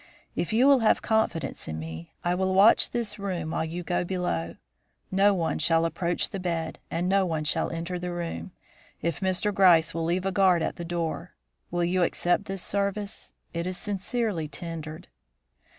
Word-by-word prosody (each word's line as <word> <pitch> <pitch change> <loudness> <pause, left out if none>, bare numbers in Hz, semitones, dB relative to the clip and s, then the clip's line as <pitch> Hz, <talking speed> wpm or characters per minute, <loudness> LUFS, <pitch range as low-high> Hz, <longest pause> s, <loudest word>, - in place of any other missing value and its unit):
If 170 - -1
you 235 +4 +4
will 280 -1 +7
have 225 - +3
confidence 220 -8 0
in 80 - -4
me, 80 +1 -7
I 175 - +1
will 190 +1 0
watch 200 +4 +6
this 230 -3 -3
room 180 -5 -3
while - - 0
you 170 +2 -4
go 175 +1 0
below. 175 - -2 0.6
No 195 +1 +4
one 165 -3 -1
shall 165 +1 +3
approach 170 +1 -1
the 195 - -4
bed 165 -3 -3
and 175 +2 -1
no 195 +1 +3
one 160 -4 -1
shall 150 - +1
enter 170 +2 -4
the 180 0 -4
room, 175 +1 -4 0.5
if 170 -3 -1
Mr. 190 +2 0
Gryce 170 -4 +5
will 165 -1 -2
leave 180 +3 0
a 195 - +1
guard 185 -3 +4
at - - -2
the 170 - -5
door. 170 0 -3 0.3
Will 175 0 0
you 180 +1 +1
accept 175 +3 +1
this 195 -2 -4
service? 200 0 -2 0.2
It 170 +1 -2
is 185 0 -3
sincerely 205 -3 -2
tendered." 160 -1 -7
175 Hz, 180 wpm, -27 LUFS, 165-195 Hz, 0.6 s, will